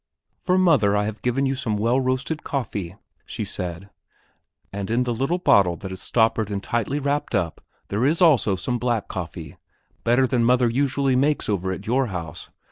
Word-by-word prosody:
"For 185 Hz, -1 st, +1 dB
mother, 135 Hz, -, +4 dB
I 105 Hz, -, +1 dB
have 110 Hz, 0 st, -5 dB
given 125 Hz, +3 st, 0 dB
you 135 Hz, -, +1 dB
some 115 Hz, -5 st, -2 dB
well 115 Hz, +5 st, +2 dB
roasted 130 Hz, +4 st, -2 dB
coffee," 105 Hz, -9 st, -4 dB, 0.3 s
she -, -, -5 dB
said, 90 Hz, +2 st, -5 dB, 0.8 s
"and 100 Hz, 0 st, -4 dB
in 120 Hz, +3 st, +2 dB
the 120 Hz, -1 st, -1 dB
little 135 Hz, +9 st, 0 dB
bottle 100 Hz, -, +4 dB
that 95 Hz, 0 st, -8 dB
is 95 Hz, -, -5 dB
stoppered 110 Hz, -2 st, +1 dB
and 100 Hz, -1 st, -3 dB
tightly 120 Hz, +4 st, -1 dB
wrapped 145 Hz, -3 st, -1 dB
up 85 Hz, -5 st, -2 dB, 0.3 s
there 105 Hz, +4 st, -1 dB
is 155 Hz, +5 st, +2 dB
also 140 Hz, -, +4 dB
some 120 Hz, +7 st, -2 dB
black 120 Hz, -2 st, -1 dB
coffee, 80 Hz, -4 st, -7 dB, 0.5 s
better 120 Hz, +3 st, +3 dB
than 125 Hz, -2 st, +1 dB
mother 125 Hz, +1 st, +4 dB
usually 135 Hz, +2 st, +1 dB
makes 145 Hz, +3 st, +1 dB
over 95 Hz, -2 st, -1 dB
at 95 Hz, +2 st, -6 dB
your 130 Hz, +3 st, +1 dB
house. 85 Hz, -4 st, -6 dB
115 Hz, 185 wpm, -23 LUFS, 100-135 Hz, 0.8 s, mother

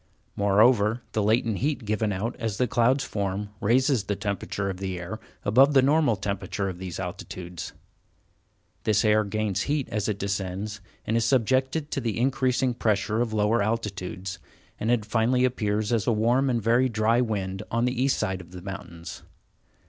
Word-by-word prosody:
Moreover, 105 Hz, +3 st, +3 dB
the 110 Hz, -, 0 dB
latent 110 Hz, 0 st, +1 dB
heat 140 Hz, -3 st, -1 dB
given 105 Hz, 0 st, 0 dB
out 105 Hz, +5 st, -2 dB
as 110 Hz, -4 st, -3 dB
the 125 Hz, -, +2 dB
clouds 120 Hz, +4 st, +2 dB
form, 100 Hz, 0 st, -3 dB
raises 125 Hz, +1 st, +2 dB
the 100 Hz, -, -1 dB
temperature 100 Hz, 0 st, -3 dB
of 95 Hz, -2 st, -3 dB
the 95 Hz, -1 st, -4 dB
air 90 Hz, +6 st, -6 dB, 0.3 s
above 135 Hz, +7 st, +5 dB
the 135 Hz, -, +6 dB
normal 145 Hz, -3 st, +3 dB
temperature 100 Hz, 0 st, -3 dB
of 90 Hz, -2 st, -5 dB
those 95 Hz, -2 st, -5 dB
altitudes. 90 Hz, -2 st, -6 dB, 1.1 s
This 110 Hz, 0 st, +2 dB
air 110 Hz, 0 st, +4 dB
gains 105 Hz, -2 st, -1 dB
heat 145 Hz, -2 st, 0 dB
as 105 Hz, 0 st, -1 dB
it 105 Hz, -, -1 dB
descends, 100 Hz, +1 st, -3 dB, 0.2 s
and 110 Hz, -, 0 dB
is 115 Hz, -1 st, +2 dB
subjected 130 Hz, +5 st, +1 dB
to 140 Hz, -, -1 dB
the 115 Hz, -3 st, -2 dB
increasing 130 Hz, 0 st, +1 dB
pressure 110 Hz, 0 st, 0 dB
of 120 Hz, -2 st, -1 dB
lower 110 Hz, +1 st, +2 dB
altitudes, 100 Hz, -3 st, -3 dB, 0.4 s
and 110 Hz, -, -1 dB
it 120 Hz, -3 st, +2 dB
finally 120 Hz, +4 st, +2 dB
appears 110 Hz, -3 st, 0 dB
as 115 Hz, -3 st, 0 dB
a -, -, +4 dB
warm 120 Hz, +5 st, +2 dB
and 120 Hz, -3 st, 0 dB
very 120 Hz, +4 st, +3 dB
dry 115 Hz, +2 st, +2 dB
wind 95 Hz, -5 st, -2 dB
on 115 Hz, +1 st, +1 dB
the 125 Hz, 0 st, -1 dB
east 135 Hz, 0 st, +2 dB
side 95 Hz, -1 st, -2 dB
of 85 Hz, -, -15 dB
the 90 Hz, -, -8 dB
mountains. 85 Hz, -4 st, -8 dB
110 Hz, 175 wpm, -26 LUFS, 100-120 Hz, 1.1 s, the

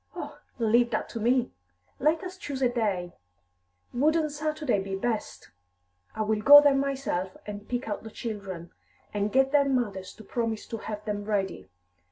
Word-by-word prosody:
"Oh, -, -, -7 dB, 0.2 s
leave 235 Hz, +1 st, +3 dB
that -, -, -2 dB
to 230 Hz, -, -5 dB
me! 245 Hz, +3 st, +2 dB, 0.5 s
Let 310 Hz, +6 st, +2 dB
us 370 Hz, 0 st, -6 dB
choose 285 Hz, -9 st, -4 dB
a 250 Hz, -, +4 dB
day; 200 Hz, -8 st, -1 dB, 0.8 s
wouldn't 305 Hz, +4 st, +2 dB
Saturday 300 Hz, -7 st, -1 dB
be 195 Hz, 0 st, -4 dB
best! 220 Hz, +2 st, -3 dB, 0.6 s
I 220 Hz, -, 0 dB
will 215 Hz, 0 st, 0 dB
go 290 Hz, +6 st, +11 dB
there 290 Hz, -1 st, +5 dB
myself, 270 Hz, -10 st, -1 dB
and 205 Hz, 0 st, -8 dB
pick 245 Hz, 0 st, -2 dB
out 205 Hz, -, -3 dB
the 220 Hz, -, -9 dB
children, 195 Hz, -7 st, -6 dB, 0.4 s
and 205 Hz, 0 st, 0 dB
get 265 Hz, +1 st, +3 dB
their 280 Hz, -1 st, +4 dB
mothers 210 Hz, -8 st, -1 dB
to 220 Hz, -, -12 dB
promise 225 Hz, 0 st, -2 dB
to 225 Hz, -, -3 dB
have 210 Hz, -1 st, -6 dB
them 205 Hz, -1 st, -3 dB
ready. 200 Hz, -2 st, -2 dB
230 Hz, 170 wpm, -28 LUFS, 205-275 Hz, 0.8 s, go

